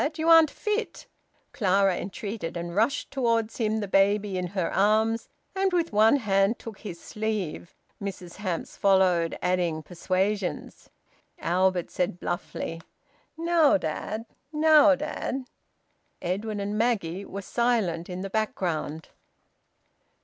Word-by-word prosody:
You 320 +1 0
aren't 325 -2 +8
fit," 425 +6 -3 0.5
Clara 195 -3 +3
entreated, 190 -2 -5
and 170 0 -5
rushed 225 +7 +1
towards 230 -4 0
him, 220 -1 0
the 205 - -3
baby 200 +1 +2
in 180 -1 -1
her 185 -1 -2
arms, 220 +3 +2 0.3
and 385 0 +1
with 340 -7 0
one 215 +4 +6
hand 200 -3 +2
took 225 -3 -9
his 180 -6 -7
sleeve. 210 -7 -4 0.3
Mrs 185 -3 -6
Hamps 185 -5 -4
followed, 185 -4 +3
adding 175 -3 0
persuasions. 185 +3 -2 0.5
Albert 180 0 +1
said 180 -1 -1
bluffly, 165 -1 -4 0.6
"Now, 330 -5 +4
dad! 200 +6 -4 0.3
Now, 305 -1 +6
dad!" 275 -2 -4 0.7
Edwin 205 +4 -3
and 200 +1 -3
Maggie 200 -6 0
were 200 0 -7
silent 205 -9 0
in 180 0 -5
the 195 - -4
background. 170 -7 -2
200 Hz, 120 wpm, -26 LUFS, 180-230 Hz, 0.7 s, aren't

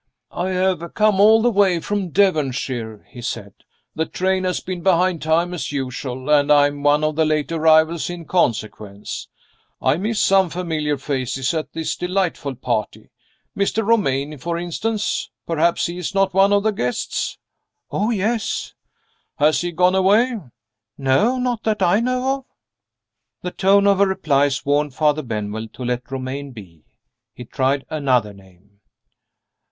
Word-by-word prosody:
"I 180 +2 -2
have 185 -2 -1
come 210 -2 +3
all 220 +2 +6
the 245 - +3
way 195 -4 +3
from 200 +1 -2
Devonshire," 130 - 0
he 125 - -10
said. 100 -4 -5 0.4
"The 160 0 -2
train 185 0 -1
has 180 -1 0
been 180 -1 -6
behind 180 -1 +2
time 165 +3 +1
as 175 - -4
usual, 130 -1 -4
and 145 0 +4
I 145 -1 +6
am 145 0 -3
one 145 +1 +3
of 155 0 0
the 160 - +2
late 155 0 0
arrivals 160 +1 +3
in 175 -1 -7
consequence. 110 - -2 0.5
I 130 +3 +2
miss 210 +4 -1
some 190 -2 +4
familiar 160 -4 -2
faces 135 -1 -2
at 160 -1 -4
this 160 -1 -2
delightful 180 -6 -2
party. 120 -3 -3 0.4
Mr. 200 +2 0
Romayne, 150 -10 +1
for 170 +5 -3
instance. 210 +5 -2 0.2
Perhaps 170 +1 +1
he 175 +1 -4
is 180 +3 -4
not 195 -1 +2
one 195 +1 +4
of 200 0 +3
the 220 - +2
guests?" 125 -12 -3 0.5
"Oh, 210 +3 0
yes." 220 +1 -1 0.6
"Has 150 +1 +3
he 175 0 -2
gone 180 +2 +3
away?" 205 +7 +3 0.6
"Not 235 - +1
that 215 -3 0
I 180 +4 +4
know 255 +3 0
of." 270 - -16 1.0
The 180 - -3
tone 200 +2 +3
of 200 -1 +4
her 200 - +5
replies 145 -7 +1
warned 145 -1 +1
Father 150 0 +2
Benwell 110 -3 -4
to 125 - -7
let 125 0 -3
Romayne 135 +1 -5
be. 90 -8 -13 0.5
He 125 - -9
tried 135 +3 -1
another 130 -8 +1
name. 100 +1 -21
160 Hz, 155 wpm, -21 LUFS, 135-190 Hz, 1.0 s, all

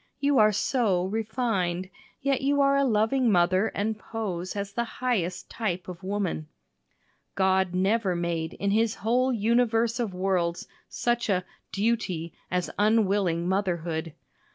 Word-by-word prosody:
You 280 -1 +3
are 215 0 +6
so 205 -4 +1
"refined," 195 -4 -1 0.3
yet 275 -1 +1
you 285 +1 +2
are 275 0 +4
a 280 - +3
loving 230 +1 +2
mother 185 +3 +3
and 215 +1 -1
pose 190 -6 -4
as 200 0 -4
the 235 - 0
highest 195 -8 -1
type 190 -6 -3
of 180 -2 -8
woman. 190 -5 -2 0.9
God 190 -1 +2
never 195 0 +1
made 170 -2 -2
in 200 0 -1
his 220 +1 +2
whole 250 +4 +1
universe 230 +1 +2
of 230 -5 -1
worlds 180 -2 0 0.2
such 240 -1 -1
a 185 -2 +1 0.3
"duty" 195 -6 -1 0.2
as 180 -1 -1
unwilling 200 -5 +2
motherhood. 170 -4 -1
200 Hz, 135 wpm, -27 LUFS, 180-230 Hz, 0.9 s, are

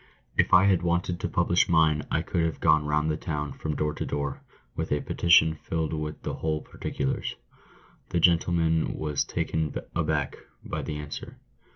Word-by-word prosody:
If - - +2
I 90 +1 +7
had 95 -4 +4
wanted 85 0 0
to - - -2
publish 85 - +2
mine, 80 -3 +4
I 80 - 0
could 85 -2 0
have 80 -1 -1
gone 75 -2 +3
round 75 +1 +1
the 75 - -1
town, 75 -3 -3
from 75 -1 -4
door 75 0 -1
to - - -4
door, 70 -1 -3 0.3
with - - -3
a 75 - +2
petition 80 -2 +4
filled 80 0 -3
with 75 -1 -4
the - - -3
whole 80 -1 -2
particulars." 65 - -3 0.7
The 85 - 0
gentleman 85 -1 +2
was 75 -2 -1
taken 80 -2 -2 0.2
aback - - 0 0.3
by - - -3
the 75 - -4
answer. 75 0 -7
80 Hz, 175 wpm, -27 LUFS, 75-85 Hz, 0.7 s, I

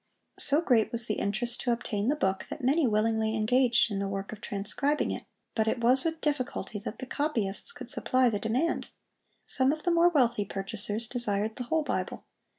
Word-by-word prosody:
So 290 +3 +3
great 240 -9 +2
was 235 -1 +4
the 215 - 0
interest 235 +4 -1
to 245 - 0
obtain 225 -2 -1
the 295 - +2
book, 190 -8 -1
that - - -7
many 280 +3 +3
willingly 220 0 +1
engaged 235 +1 +3
in 200 - -2
the 200 - -1
work 195 0 -4
of 215 -1 -9
transcribing 210 +9 -1
it, - - -5 0.3
but 220 -1 0
it 230 - 0
was 250 +3 +4
with 320 -1 -2
difficulty 255 -7 -2
that 210 - -6
the 260 - -6
copyists 255 - -1
could - - -6
supply 255 0 +2
the 215 -3 0
demand. 245 +11 0 0.6
Some 260 0 +2
of 310 +1 -4
the 350 - +2
more 340 +1 +5
wealthy 240 -9 +2
purchasers 205 +3 -3
desired 220 -3 -1
the 250 - -5
whole 315 +6 +1
Bible. - - -3
235 Hz, 195 wpm, -29 LUFS, 210-270 Hz, 0.6 s, more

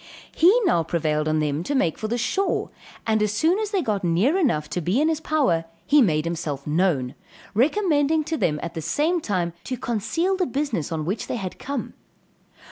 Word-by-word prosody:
He 375 +9 +6 0.3
prevailed 155 -2 0
on 155 0 +1
them 150 0 0
to 280 +11 -2
make 170 - +2
for 215 - -2
the 235 +2 -1
shore, 380 - -1 0.3
and 220 -1 +2
as 210 -1 +1
soon 320 - +2
as 430 -2 -2
they 395 -4 0
got 205 -3 -1
near 180 - +2
enough 230 - +1
to 180 - -1
be 180 - +1
in 310 +2 +3
his 320 -2 0
power, 265 - +1 0.2
he 295 0 +5
made 155 -8 +2
himself 160 -5 -3
known, 150 -5 +1 0.4
recommending 310 - +2
to 320 +2 -2
them 150 - 0
at 170 - -5
the 160 - -4
same 310 - 0
time 180 - -1
to 255 - -3
conceal 250 - -1
the 370 -1 0
business 260 - -2
on 155 -2 -2
which 200 +6 -3
they - - -2
had 190 -6 -5
come. 275 -3 -4
220 Hz, 200 wpm, -24 LUFS, -, 0.4 s, He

